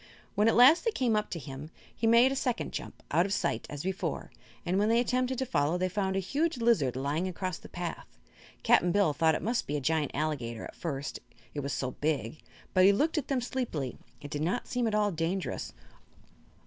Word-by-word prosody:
When 210 +2 +3
at 225 - +4
last 265 +8 +7
they 470 - +2
came 250 - +1
up 210 0 0
to - - -4
him 140 +1 -8 0.3
he 225 - 0
made 235 +3 +6
a - - -1
second 250 -3 -1
jump - - -7
out 175 +3 +3
of - - -6
sight, 170 -4 -1
as 145 -1 -6
before 190 +1 -3 0.3
and 180 +2 +1
when 210 +2 +2
they 230 +1 +4
attempted 255 +1 0
to 265 - -1
follow 150 - +1
they 185 +1 0
found 190 0 -1
a - - +2
huge 290 - -1
lizard 225 - +2
lying 145 +7 -1
across 185 -1 -4
the - - -13
path. 175 -1 -5 0.6
Cap'n 175 - +4
Bill 195 -5 +3
thought 160 +1 +3
it - - -4
must 235 +2 0
be 150 - -1
a - - -1
giant 150 0 +1
alligator, 135 -7 -2
at - - -10
first, 140 -5 -4 0.3
it 150 - -3
was 140 0 -3
so 130 -2 -2
big; 145 -2 -2 0.3
but 185 - +5
he 195 - +8
looked 305 +10 +1
at 275 - -7
them 270 -3 0
sleepily 225 - -3 0.2
and 145 - -8
did 145 - -3
not 180 +10 -1
seem 245 -2 0
at 215 - 0
all 210 -1 +2
dangerous. 170 +3 -2
185 Hz, 220 wpm, -30 LUFS, 150-235 Hz, 0.6 s, he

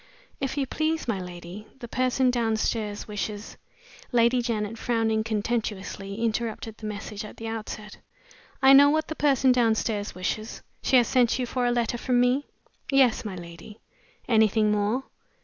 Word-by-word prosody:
"If 270 0 -3
you 275 - +1
please, 315 +3 -1
my 215 -5 0
lady, 180 +3 -9
the 245 -3 -8
person 255 +1 +1
downstairs 220 -3 -1
wishes 210 0 -5 0.3
" 485 - -21
Lady 240 0 +3
Janet, 225 -2 -2
frowning 225 -2 +1
contemptuously, 210 -3 -3
interrupted 225 -1 -2
the 215 - -5
message 210 0 -6
at 210 - -10
the 225 - -6
outset. 215 -2 -6 0.7
"I 265 +1 +8
know 285 +1 +8
what 310 +1 0
the 315 - -3
person 270 -4 +3
downstairs 220 -4 +1
wishes. 215 +4 -4 0.2
She 265 - +2
has 240 - +4
sent 250 -3 +3
you 255 - -1
for 245 0 -1
a - - +2
letter 240 0 0
from 250 -1 +1
me?" 250 +3 +2 0.4
"Yes, 265 -4 +4
my 205 -4 -5
lady." 175 +5 -11 0.5
"Anything 220 -2 +3
more?" 210 +5 0
225 Hz, 160 wpm, -26 LUFS, 210-250 Hz, 0.7 s, I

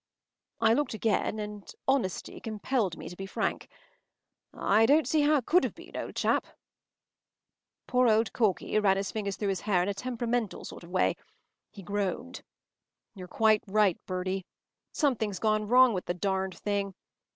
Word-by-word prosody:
” - - -55
I - - +5
looked 285 -2 0
again, 220 0 0
and 210 -1 -7 0.2
honesty 265 -9 0
compelled 215 -3 -2
me - - -8
to 180 - -8
be 195 +1 -6
frank. - - -2 0.8
“I 220 +3 +3
don’t 300 +3 +5
see 310 - +2
how 295 +1 +4
it 255 - -3
could 360 +3 +4
have - - -2
been, - - -13
old - - -5
chap.” - - +1 1.4
Poor 250 0 +3
old 220 -1 +3
Corky 215 -1 +1
ran 195 -2 +3
his 195 0 -2
fingers 200 -3 -3
through 205 - -2
his 195 - -1
hair 190 -4 +2
in 190 - -1
a - - 0
temperamental 240 0 -2
sort - - -9
of 170 - -12
way. 185 +1 +1 0.5
He 200 - -12
groaned. 190 - -3 0.7
“You’re 185 -2 -10
right 215 0 +3
quite, 200 -2 +2
Bertie. 185 0 -3 0.4
Something’s 220 - 0
gone 215 0 +1
wrong 250 +1 +6
with 185 - -3
the 175 - -2
darned 190 0 -2
thing. 200 -2 -2
210 Hz, 170 wpm, -29 LUFS, 190-230 Hz, 1.4 s, wrong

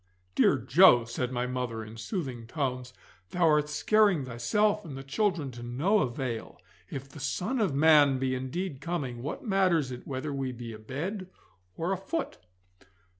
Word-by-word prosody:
'Dear 140 - +4
Joe,' 130 0 +6
said 120 +2 -3
my 125 -1 -1
mother, 125 -3 -3
in 110 +1 -10
soothing 125 - -5
tones, 130 -3 -3 0.4
'thou 175 -2 +2
art 150 -1 +3
scaring 195 0 +3
thyself 205 - +1
and 145 -7 -8
the 135 - -7
children 160 -1 0
to 120 -1 -10
no 140 - +1
avail. 120 - -3 0.3
If 135 0 -6
the 140 - -12
Son 180 - -2
of 190 -10 +1
Man 145 -2 +6
be 130 0 0
indeed 135 +4 -4
coming, 140 -8 -3
what 145 - -5
matters 185 - +2
it 125 - -8
whether 140 +2 -3
we 135 -2 -3
be 120 -1 -7
abed 160 - -5 0.5
or 170 +3 -1
afoot? 195 - -3
135 Hz, 160 wpm, -29 LUFS, 125-175 Hz, 0.5 s, Joe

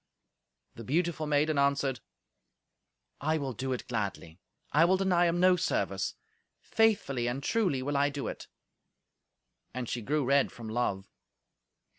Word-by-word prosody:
The 115 - -9
beautiful 160 +4 -1
maiden 150 0 +2
answered, 140 -2 +1 1.2
"I 155 +3 0
will 135 -4 -3
do 130 +4 -4
it 125 - -4
gladly. 100 -7 -4 0.3
I 155 - +5
will 185 +3 +4
deny 180 -2 +3
him 170 +1 0
no 185 0 +5
service. 180 - -1 0.4
Faithfully 200 - +1
and 130 +3 -3
truly 180 -13 +1
will 145 +2 -2
I 145 +1 +3
do 140 -1 -4
it." - - -7 1.3
And 125 -2 -3
she 120 - -3
grew 145 +4 0
red 140 +1 +3
from 115 -2 -9
love. 100 -4 -1
140 Hz, 140 wpm, -30 LUFS, 125-165 Hz, 1.3 s, I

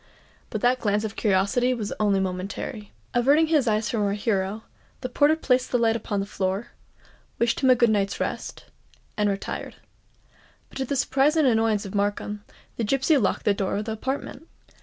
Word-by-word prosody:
But 215 - -4
that 250 +1 +3
glance 210 -2 0
of 220 -1 -4
curiosity 210 +5 +2
was 215 -4 -4
only 205 -2 +2
momentary. 190 +4 -4 0.2
Averting 280 +6 +4
his 305 -5 +2
eyes 215 0 +1
from 225 - -1
our 200 -1 +1
hero, 205 0 -1 0.4
the 255 - -4
porter 290 +4 +3
placed 255 -5 +1
the 245 - +3
light 225 -1 +2
upon 205 -2 -2
the 195 - -2
floor, 195 +2 -2 0.7
wished 235 0 +1
him 260 - +3
a 255 - +7
good 235 -2 +3
night's 200 -2 0
rest, - - -4 0.5
and 210 -1 +1
retired. 195 0 -4 0.9
But - - -9
to 265 - 0
the 280 - -2
surprise 275 +3 +2
and 310 -4 +4
annoyance 225 -3 +2
of 195 - -7
Markham, 205 0 -2 0.3
the 235 - -1
gipsy 275 +7 +2
locked 205 -8 0
the 205 - +4
door 195 -1 -2
of 210 - -3
the 220 - -3
apartment. 265 +6 -4
220 Hz, 185 wpm, -25 LUFS, 205-255 Hz, 0.9 s, a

